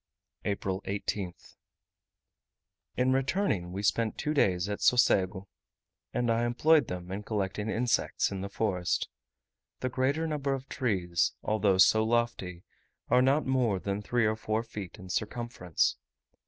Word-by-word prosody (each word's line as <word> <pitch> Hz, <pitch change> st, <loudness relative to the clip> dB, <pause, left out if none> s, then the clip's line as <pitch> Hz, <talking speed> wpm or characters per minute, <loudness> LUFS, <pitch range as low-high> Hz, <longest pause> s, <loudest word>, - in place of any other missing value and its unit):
April 100 Hz, -1 st, -2 dB
18th. 100 Hz, -2 st, -4 dB, 1.4 s
In 130 Hz, +1 st, +3 dB
returning 130 Hz, -, 0 dB
we 100 Hz, +2 st, -4 dB
spent 110 Hz, +2 st, +1 dB
two 150 Hz, 0 st, -1 dB
days 90 Hz, -, +2 dB
at 105 Hz, 0 st, -3 dB
Socego, 95 Hz, -6 st, +3 dB, 0.7 s
and 120 Hz, -1 st, 0 dB
I 115 Hz, +1 st, +1 dB
employed 140 Hz, +4 st, +3 dB
them 90 Hz, 0 st, -6 dB
in 100 Hz, +2 st, -3 dB
collecting 105 Hz, 0 st, -2 dB
insects 120 Hz, -1 st, +1 dB
in 95 Hz, -1 st, -4 dB
the 100 Hz, -, -4 dB
forest. 95 Hz, -5 st, -1 dB, 0.7 s
The 130 Hz, -, 0 dB
greater 135 Hz, +5 st, 0 dB
number 145 Hz, -3 st, -1 dB
of 135 Hz, 0 st, -8 dB
trees, 90 Hz, -9 st, 0 dB
although 105 Hz, -3 st, +2 dB
so 105 Hz, +4 st, +6 dB
lofty, 110 Hz, -6 st, -1 dB, 0.5 s
are 125 Hz, +1 st, +6 dB
not 135 Hz, +4 st, +3 dB
more 125 Hz, -6 st, +1 dB
than 100 Hz, +2 st, -3 dB
three 120 Hz, +2 st, +1 dB
or 110 Hz, 0 st, +2 dB
four 110 Hz, +1 st, -2 dB
feet 105 Hz, -6 st, -8 dB
in 95 Hz, -, -11 dB
circumference. 105 Hz, -3 st, -1 dB
110 Hz, 140 wpm, -29 LUFS, 95-125 Hz, 1.4 s, so